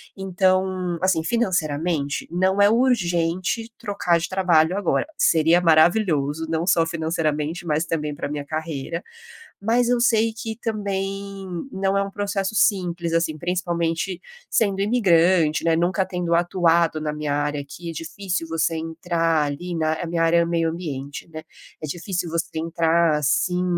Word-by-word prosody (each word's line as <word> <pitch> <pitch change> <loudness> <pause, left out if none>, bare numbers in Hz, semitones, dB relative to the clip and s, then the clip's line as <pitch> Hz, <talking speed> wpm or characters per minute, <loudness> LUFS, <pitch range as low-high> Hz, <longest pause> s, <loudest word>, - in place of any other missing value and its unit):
Então, 185 -2 0
assim, 185 -4 +2
financeiramente, 165 -8 -1
não 185 +4 +1
é 200 - +6
urgente 210 -2 +1
trocar 180 -4 0
de 165 - -4
trabalho 180 -2 +2
agora. 205 - 0
Seria 165 +2 +4
maravilhoso, 160 -3 +3
não 165 +2 -2
só 165 -3 +4
financeiramente, 160 0 -2
mas 155 -1 0
também 150 -3 -2
pra 145 - -5
minha 145 -1 -4
carreira, 160 +1 -4 0.6
mas 235 +3 +2
eu 245 -1 +2
sei 225 -1 +3
que 225 0 -5
também 195 -3 -4 0.3
não 195 0 0
é 200 - +2
um 200 - -5
processo 200 0 -2
simples 180 -5 +1
assim, 165 -2 0
principalmente 170 +1 -2 0.3
sendo 200 -3 +1
imigrante, 175 -8 +3
né, 165 -1 +3
nunca 180 +3 +1
tendo 180 -2 -2
atuado 170 -2 +2
na 155 -1 -2
minha 150 -1 -2
área 145 0 -1
aqui, 165 +5 -8
difícil 165 +2 -4
você 165 0 0
entrar 165 0 0
ali 170 +5 -4
na 155 -1 +1
a - - -3
minha 165 0 0
área 165 +1 +4
é 170 - +2
meio 165 -1 0
ambiente, 145 -5 -6
né. 155 -1 -8 0.4
É - - -3
difícil 175 +3 -3
você 165 0 -1
entrar 165 -1 +2
assim, 180 +5 +1
170 Hz, 150 wpm, -23 LUFS, 160-190 Hz, 0.6 s, é